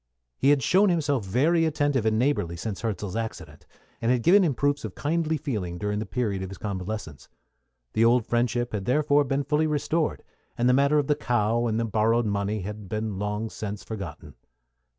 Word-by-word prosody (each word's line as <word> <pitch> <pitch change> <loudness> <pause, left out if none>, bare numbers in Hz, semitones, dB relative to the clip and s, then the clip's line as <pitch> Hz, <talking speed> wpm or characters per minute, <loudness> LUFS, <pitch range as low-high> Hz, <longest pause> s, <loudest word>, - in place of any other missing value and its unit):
He 135 - +2
had 145 -3 +4
shown 195 - +4
himself 145 - +1
very 145 - +2
attentive 145 -6 +1
and 110 0 +2
neighborly 115 -10 0
since 95 +3 -5
Hirzel's 105 -3 -3
accident, 115 -1 -6 0.3
and 115 - +2
had 125 -2 +1
given 195 +5 +6
him 150 -7 +1
proofs 145 +2 0
of 110 -4 -6
kindly 160 +1 0
feeling 100 -11 -3
during 105 +2 -2
the 110 - -4
period 105 -5 -2
of 95 - -5
his 95 - -9
convalescence. 95 -6 -5 0.6
The 110 - +3
old 120 0 +4
friendship 120 0 0
had 100 -3 -3
therefore 145 +2 +3
been 135 +1 0
fully 150 +3 +1
restored, 155 +2 -1 0.3
and 120 - +2
the 125 - +5
affair 140 +3 +3
of 145 - +2
the 150 - +3
cow 120 -2 0
and 110 0 0
the 115 - 0
borrowed 115 +2 +2
money 100 0 -1
had 105 0 -7
been 110 -3 -3
long 105 +2 -3
since 105 -2 -6
forgotten. 85 -8 -7
115 Hz, 190 wpm, -26 LUFS, 105-145 Hz, 0.6 s, given